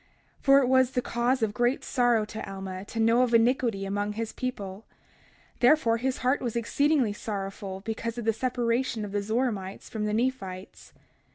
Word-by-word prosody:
31:2 - - -29
For 275 0 +7
it - - +1
was 260 0 +4
the 250 -1 0
cause 240 +1 0
of 210 -2 0
great 245 +3 +1
sorrow 240 -4 +2
to 215 -1 -7
Alma 190 -1 -6
to 225 - -6
know 230 +2 +4
of 245 -2 +3
iniquity 230 -3 +2
among 205 +1 -2
his 225 +1 -4
people; 210 -6 -5 0.8
therefore 245 -3 +4
his 260 +2 -1
heart 260 +3 +2
was 240 -3 -3
exceedingly 260 0 +2
sorrowful 195 -2 -5
because 225 +2 -4
of 235 - -4
the 225 - +3
separation 240 -1 -1
of 200 - -7
the 205 0 -1
Zoramites 210 -3 -2
from 215 -2 -3
the 210 - -1
Nephites. 220 -7 -3
230 Hz, 180 wpm, -27 LUFS, 205-250 Hz, 0.8 s, For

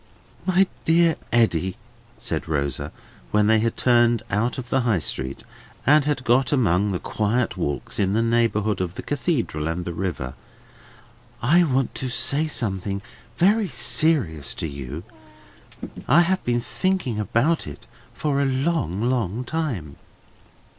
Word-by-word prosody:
"My 185 +1 +4 0.2
dear 165 0 +4 0.2
Eddy," 95 -6 +2 0.4
said - - -3
Rosa, 70 -4 -2 0.4
when 105 0 +3
they 110 +1 +4
had 115 +1 -1
turned 120 -2 +3
out 115 +5 0
of 125 -2 -6
the 135 - +3
High 120 -5 +2
Street, 65 -4 -4 0.4
and 145 +1 +5
had 145 -4 -1
got 125 +1 +3
among 105 - +2
the 95 - -1
quiet 110 +2 -1
walks 70 -7 -3
in 95 -1 +2
the 115 +2 +2
neighbourhood 115 -3 +1
of 90 -1 -3
the - - -6
Cathedral 130 - -1
and 85 +2 -3
the 85 - -4
river: 80 -8 -3 1.1
"I 170 +9 +5
want 135 -3 0
to 130 - -3
say 140 +5 +1
something 100 - -2 0.3
very 205 +4 +3
serious 120 - +1
to - - -3
you. 70 +2 -7 1.0
I 150 +7 +6
have 185 +2 +1
been 120 0 0
thinking 180 - -1
about 120 - +1
it - - -9 0.3
for 140 -2 0
a - - +2
long, 130 - 0
long 120 -2 0
time." 120 - -3
115 Hz, 145 wpm, -23 LUFS, 95-140 Hz, 1.1 s, I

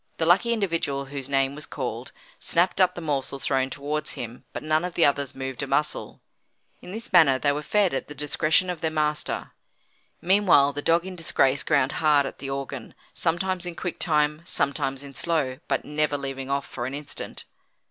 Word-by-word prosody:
The 160 - +1
lucky 190 +8 +4
individual 165 -10 0
whose 135 -1 -6
name 135 0 +2
was 150 +1 -8
called, 125 -3 -4 0.3
snapped 180 +3 +2
up 180 0 +4
the 175 - -6
morsel 140 -3 -2
thrown 135 -1 0
towards 145 +2 -3
him, 120 0 -7
but - - -6
none 155 +1 +2
of 180 -1 -4
the 170 - +5
others 140 -2 +1
moved 135 -1 -4
a - - -3
muscle. - - -1 0.6
In - - -9
this 225 +2 -8
manner 155 -7 +7
they 145 +2 +2
were 145 +1 -2
fed 200 +2 +2
at 135 - -2
the 150 - -9
discretion 155 +5 +2
of 170 -3 -7
their 160 - +1
master. 150 -1 -1 0.7
Meanwhile 175 -7 +4
the 145 - -3
dog 170 +3 +2
in 190 -1 -6
disgrace 140 -5 +2
ground 140 -3 +2
hard 150 -3 +4
at - - -7
the 135 - -5
organ, 135 -2 -5 0.2
sometimes 180 +1 0
in 175 - -5
quick 180 0 -4
time, 150 -1 +2
sometimes 135 -4 -1
in 140 -1 -10
slow, 140 -3 -1
but - - 0
never 150 0 0
leaving 135 -1 -5
off 140 0 0
for 120 -1 -5
an 135 - -4
instant. 145 0 -6
150 Hz, 195 wpm, -25 LUFS, 135-170 Hz, 0.7 s, manner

